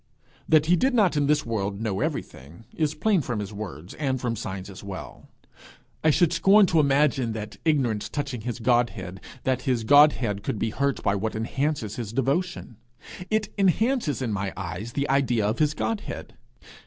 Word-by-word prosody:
That 155 -1 +5
he 175 +3 +4
did 260 +8 +1
not 200 -8 +3
in 145 -1 +2
this 150 0 +2
world 100 -3 -2
know 110 -4 -2
everything, 80 - -5
is 155 -1 0
plain 195 +2 +2
from 120 -4 -3
his 105 0 -5
own 100 - -9
words, 90 -4 -7
and 135 -3 -1
from 120 -2 -2
signs 95 -4 -5
as 95 0 -11
well: 100 -2 -9 0.7
I 155 - +5
should 170 +2 +3
scorn 195 +4 +6
to 165 -3 +2
imagine 135 -4 +2
that 110 0 -6
ignorance 130 -9 +1
touching 140 -5 -4
his 120 +1 -4
Godhead, 115 -6 0 0.2
that 130 -1 0
his 120 -3 +1
Godhead 125 -6 +5
could 105 - -3
be 110 +1 -1
hurt 140 +3 -1
by 100 - +2
what 110 +3 -2
enhances 115 -1 -2
his 115 -3 -5
devotion. 135 - -1 0.5
It 215 -1 -1
enhances 200 - +1
in 115 -4 -1
my 100 -1 -2
eyes 95 +5 -5
the 140 0 -1
idea 125 -5 +2
of 110 - -1
his 150 -1 +2
Godhead. 225 -2 -4
125 Hz, 180 wpm, -25 LUFS, 105-150 Hz, 0.7 s, scorn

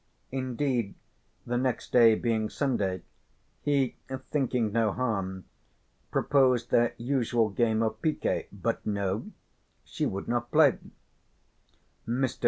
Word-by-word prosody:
Indeed, 130 -4 -1 0.5
the 120 0 0
next 130 -2 -2
day 115 -3 +7
being 110 -2 0
Sunday 100 - -1 0.6
he, 140 -4 +1 0.3
thinking 125 -6 +1
no 110 -1 +2
harm, 95 -7 -2 0.6
proposed 130 -4 +2
their 120 0 +3
usual 120 -3 +1
game 110 +1 +1
of 110 -1 -2
piquet, 155 -2 0
but - - -2
no, 100 -1 -2 0.6
she - - -2
would 100 - -4
not 120 0 -1
play. 150 -4 +5 1.3
Mr. 125 +2 -1
120 Hz, 110 wpm, -28 LUFS, 110-130 Hz, 1.3 s, day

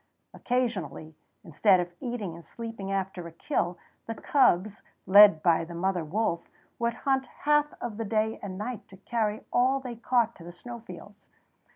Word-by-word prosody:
Occasionally, 185 - -2 0.3
instead 185 +2 +3
of 175 0 -3
eating 235 -8 -4
and 170 +1 -11
sleeping 225 -3 -7
after 190 -3 -3
a - - -10
kill, 175 +1 -2 0.3
the 225 - -4
cubs, 215 -8 +2 0.2
led 200 -4 +8
by 170 -2 +4
the 170 +1 -8
mother 180 0 0
wolf, 170 +1 -2 0.3
would 235 -1 0
hunt 265 +1 0
half 295 +3 +1
of 225 -4 -5
the 225 - -3
day 220 +1 0
and 190 -2 -6
night 225 +2 -4
and 190 0 -17
carry 220 -2 -1
all 260 +2 +3
they 250 -3 -7
caught 235 0 +1
to 170 - -12
the 175 - -9
snow 235 +7 -9
fields. 230 - -13
210 Hz, 170 wpm, -28 LUFS, 175-235 Hz, 0.3 s, led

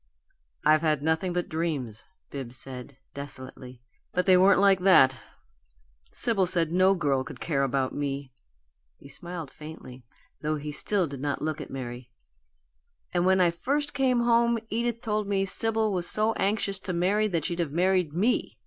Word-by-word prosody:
"I've 155 0 +5
had 155 -3 0
nothing 160 +3 0
but 175 0 -2
dreams," 150 -9 -3 0.3
Bibbs 130 -3 -6
said, 130 +1 -8 0.2
desolately, 130 -3 -9 0.3
"but 180 0 0
they 185 - +6
weren't 190 +2 +5
like 195 -1 +5
that. 180 -9 +5 1.0
Sibyl 200 -6 0
said 170 -3 +1
no 185 +2 +4
girl 140 -6 0
could 145 -3 -10
care 140 -5 -1
about 135 -1 0
me." 140 -2 -4 0.6
He - - -15
smiled 165 +1 -6
faintly, 150 -5 -11 0.4
though 155 0 -1
still 195 +6 0
he 165 - -3
did 140 -2 -7
not 145 0 -2
look 155 0 -2
at - - -8
Mary. 120 -2 -7 1.0
"And 175 0 +2
when 190 0 +4
I 175 -2 +4
first 285 - -2
came 255 -3 +2
home 235 0 +3
Edith 235 +1 -1
told 210 -2 -1
me 195 -1 +1
Sibyl 220 +1 +1
was 175 -2 +1
so 215 +1 +3
anxious 200 -1 -1
to 185 - -4
marry 195 +5 +1
that 170 -7 -2
she'd 175 -1 -3
have 165 -5 -1
married 180 0 +1
ME. 205 +10 0
170 Hz, 165 wpm, -27 LUFS, 140-195 Hz, 1.0 s, they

